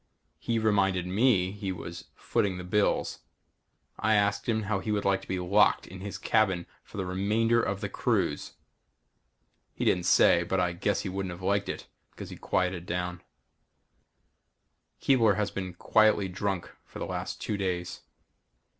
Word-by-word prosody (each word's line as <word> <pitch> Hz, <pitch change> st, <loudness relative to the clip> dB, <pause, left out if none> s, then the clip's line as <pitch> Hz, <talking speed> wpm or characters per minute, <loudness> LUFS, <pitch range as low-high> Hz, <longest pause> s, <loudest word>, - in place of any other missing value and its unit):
He 115 Hz, -, -1 dB
reminded 100 Hz, -4 st, +2 dB
me 95 Hz, -1 st, +2 dB
he 100 Hz, -1 st, -4 dB
was 85 Hz, -1 st, -7 dB
footing 95 Hz, -3 st, -1 dB
the 90 Hz, -, -6 dB
bills. 100 Hz, +3 st, 0 dB, 0.8 s
I 110 Hz, 0 st, +3 dB
asked 100 Hz, +4 st, +1 dB
him 110 Hz, -1 st, +1 dB
how 105 Hz, -1 st, -1 dB
he 105 Hz, -, -3 dB
would 105 Hz, -1 st, -1 dB
like 95 Hz, 0 st, +2 dB
to -, -, -14 dB
be 95 Hz, -, -2 dB
locked 95 Hz, +4 st, +3 dB
in 95 Hz, -, -10 dB
his 100 Hz, +1 st, -6 dB
cabin 95 Hz, -6 st, +1 dB, 0.2 s
for -, -, -12 dB
the 95 Hz, -, -2 dB
remainder 110 Hz, +6 st, +2 dB
of 100 Hz, -1 st, -2 dB
the 105 Hz, -, -1 dB
cruise? 95 Hz, -, -1 dB, 1.2 s
He -, -, -2 dB
didn't 90 Hz, -1 st, +2 dB
say, 85 Hz, -, +6 dB
but 90 Hz, +2 st, -1 dB
I 90 Hz, -1 st, +1 dB
guess 95 Hz, +3 st, 0 dB
he 95 Hz, -, -4 dB
wouldn't 95 Hz, 0 st, -3 dB
have 90 Hz, +1 st, -8 dB
liked 100 Hz, +1 st, +1 dB
it -, -, -5 dB, 0.2 s
because -, -, -10 dB
he -, -, -7 dB
quieted 90 Hz, -1 st, -1 dB
down. 90 Hz, 0 st, -3 dB, 1.8 s
Keebler 115 Hz, -7 st, +4 dB
has 100 Hz, -3 st, -1 dB
been 95 Hz, -2 st, -5 dB
quietly 110 Hz, +1 st, +3 dB
drunk 95 Hz, 0 st, -3 dB
for -, -, -12 dB
the -, -, -3 dB
last -, -, -4 dB
two 105 Hz, -, -2 dB
days. 90 Hz, -3 st, -3 dB
95 Hz, 165 wpm, -28 LUFS, 90-105 Hz, 1.8 s, say